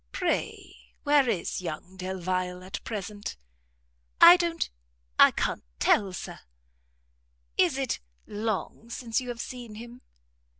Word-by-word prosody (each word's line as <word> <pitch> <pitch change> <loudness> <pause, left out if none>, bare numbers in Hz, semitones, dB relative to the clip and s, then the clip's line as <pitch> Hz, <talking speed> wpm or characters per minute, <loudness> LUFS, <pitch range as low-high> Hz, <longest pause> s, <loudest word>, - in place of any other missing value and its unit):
Pray - - -3
where 285 -3 +4
is 190 -3 -1
young 180 +2 -6
Delvile 185 -1 -3
at 190 +1 -6
present?" 205 -1 -5 0.8
"I 345 - +11
don't 340 -2 0 0.5
I - - +10
can't - - -2 0.2
tell, 200 -3 +3
Sir." 180 - -7 1.2
"Is - - +3
it - - -1 0.3
long 215 +1 -3
since 235 0 -1
you 250 - -7
have 240 -1 -5
seen 240 -4 -7
him?" 240 +3 -10
210 Hz, 120 wpm, -28 LUFS, 185-240 Hz, 1.2 s, I